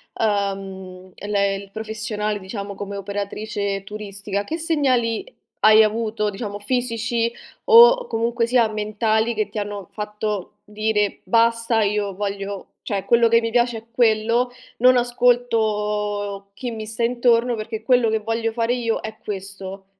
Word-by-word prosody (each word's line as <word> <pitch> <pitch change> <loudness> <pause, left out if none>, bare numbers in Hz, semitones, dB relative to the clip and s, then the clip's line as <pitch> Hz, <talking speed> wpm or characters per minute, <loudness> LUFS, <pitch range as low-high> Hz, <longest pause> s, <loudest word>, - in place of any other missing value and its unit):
ehm, 195 -3 -3
el 205 +1 -6
ehm, 200 0 +1
il 195 -1 -14
professionale, 215 -1 -3
diciamo, 200 +1 -6
come 200 0 -6
operatrice 200 0 -3
turistica, 200 -1 -5
che 325 +9 -4
segnali 280 - 0 0.3
hai 215 0 +7
avuto, 215 -1 0
diciamo, 205 0 -5
fisici 230 0 -1 0.3
o 485 +1 +8
comunque 230 +1 0
sia, 240 -2 +4
mentali 215 +2 0
che 215 -1 -1
ti 215 - -4
hanno 205 -2 -5
fatto 210 -2 -4
dire: 210 -1 -1
"Basta, 230 +2 +2
io 205 -1 0
voglio 200 -1 -4 0.2
cioè 200 -3 -3
quello 235 -1 +4
che 230 0 +5
mi 230 0 -2
piace 240 -1 +2
è 220 - -11
quello, 230 +1 +2 0.3
non 250 +1 +6
ascolto 210 -5 0
chi 245 +3 -5
mi 220 -1 -6
sta 225 +2 -3
intorno 240 0 +2
perché 220 0 -5
quello 245 -1 +3
che 220 0 +1
voglio 225 +1 -1
fare 230 +1 0
io 230 -2 -1
è 220 0 -7
questo"? 195 -1 -6
215 Hz, 145 wpm, -22 LUFS, 205-230 Hz, 0.3 s, o